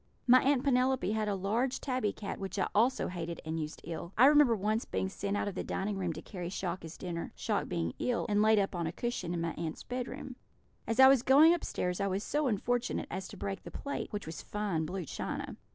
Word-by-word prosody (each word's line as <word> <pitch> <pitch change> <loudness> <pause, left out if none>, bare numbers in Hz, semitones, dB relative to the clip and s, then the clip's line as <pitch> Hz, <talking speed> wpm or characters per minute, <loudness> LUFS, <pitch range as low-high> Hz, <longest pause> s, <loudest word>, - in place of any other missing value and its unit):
My 255 +1 +7
Aunt 270 -1 +2
Penelope 260 -3 +2
had 215 -1 0
a 205 - 0
large 225 +7 0
tabby 255 -6 -1
cat, 200 - -6
which 195 +1 -5
I 190 - +1
also 235 +5 +3
hated 170 -1 -5
and 160 +1 -2
used 155 0 -5
ill. 170 +2 -6
I 245 - +8
remember 290 -4 +6
once 215 +3 0
being 190 - -2
sent 200 +1 -2
out - - -1
of 200 - -3
the - - -3
dining 200 +1 -2
room 185 -3 -1
to 160 - -8
carry 180 -4 -6
Shock 185 -1 -3
his 165 +1 -9
dinner, 170 -2 -5
Shock - - -1
being 85 0 -2
ill, 245 -2 0
and 205 -2 +2
laid 220 0 +5 0.2
on 170 -2 -2
a - - -2
cushion 190 -3 -3
in 170 -1 -2
my 165 0 -1
aunts' 160 0 -5
bedroom. 250 0 -5 0.5
As 225 +2 -1
I 265 - +10
was 270 -2 +6
going 290 +6 +7
upstairs 180 - -2
I 200 - +1
was 195 +1 -1
so 295 0 0
unfortunate 245 +2 -1
as 190 +1 -4
to - - -10
break 195 -1 -4
the - - -9
plate, 280 - -5
which 205 -1 -4
was 160 -1 -6
fine 195 -7 -2
blue 185 -1 -4
china. - - -4
205 Hz, 230 wpm, -32 LUFS, 175-245 Hz, 0.5 s, I